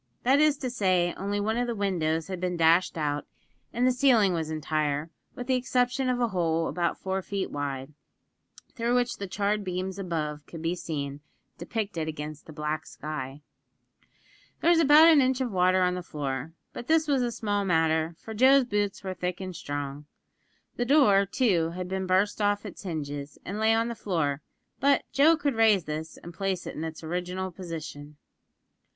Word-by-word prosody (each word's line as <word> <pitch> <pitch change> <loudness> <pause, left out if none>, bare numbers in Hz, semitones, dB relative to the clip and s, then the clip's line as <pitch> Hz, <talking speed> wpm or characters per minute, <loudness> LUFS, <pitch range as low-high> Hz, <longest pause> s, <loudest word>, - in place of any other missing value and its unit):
That 265 +3 +4
is 300 -1 +4
to 255 -3 -3
say, 185 -6 +2
only 200 +1 -2
one 220 +3 0
of 245 0 0
the 235 - -2
windows 165 -6 0
had 185 -2 -6
been 180 -1 -1
dashed 165 +2 +3
out, 150 -2 -2 0.4
and 245 +2 0
the 255 - +5
ceiling 245 -7 +4
was 160 -2 -2
entire, 155 0 -1 0.2
with 245 - -6
the 260 - +1
exception 250 +1 +1
of 250 -1 0
a 240 -1 +1
hole 165 -4 0
about 175 -1 -1
four 190 0 -2
feet 195 0 -3
wide, 140 0 -4 0.8
through 235 0 0
which 245 0 +1
the 200 - -5
charred 205 +2 -1
beams 185 +1 -4
above 155 -5 -3
could 165 -1 -9
be 165 +1 0
seen 145 -5 -4 0.4
depicted 180 -3 -3
against 155 -1 -6
the - - -9
black 150 +1 -3
sky. 145 -2 -6 1.2
There 340 - +4
was 335 - +5
about 310 +1 +8
an 315 -4 +7
inch 260 0 +1
of 255 -3 -1
water 185 0 +3
on 180 0 +2
the 180 - -3
floor; 145 -2 -4 0.2
but 240 - -7
this 320 0 +3
was 275 -3 +2
a 240 -1 0
small 205 -3 -1
matter, 160 -2 +1
for 220 - -9
Joe's 260 +4 +6
boots 205 -3 -1
were 190 -1 -3
thick 180 -1 -3
and 185 -2 -6
strong. 145 -1 -5 0.7
The 245 - 0
door, 240 -8 +5
too, 180 -8 +1
had 180 0 -4
been 190 0 -3
burst 190 +3 +2
off 205 0 +1
its - - -8
hinges, 145 -5 -5
and 200 +3 -4
lay 220 +1 +4
on 230 +1 +1
the 235 - -3
floor; 155 -10 -1 0.4
but 280 +1 +3
Joe 310 +4 +5
could 285 -3 0
raise 220 -5 +4
this, 155 +1 -5
and 170 - -10
place 190 0 -2
it - - -5
in 155 - -5
its 160 0 -6
original 180 +3 -3
position. 155 -4 -8
185 Hz, 190 wpm, -27 LUFS, 160-230 Hz, 1.2 s, about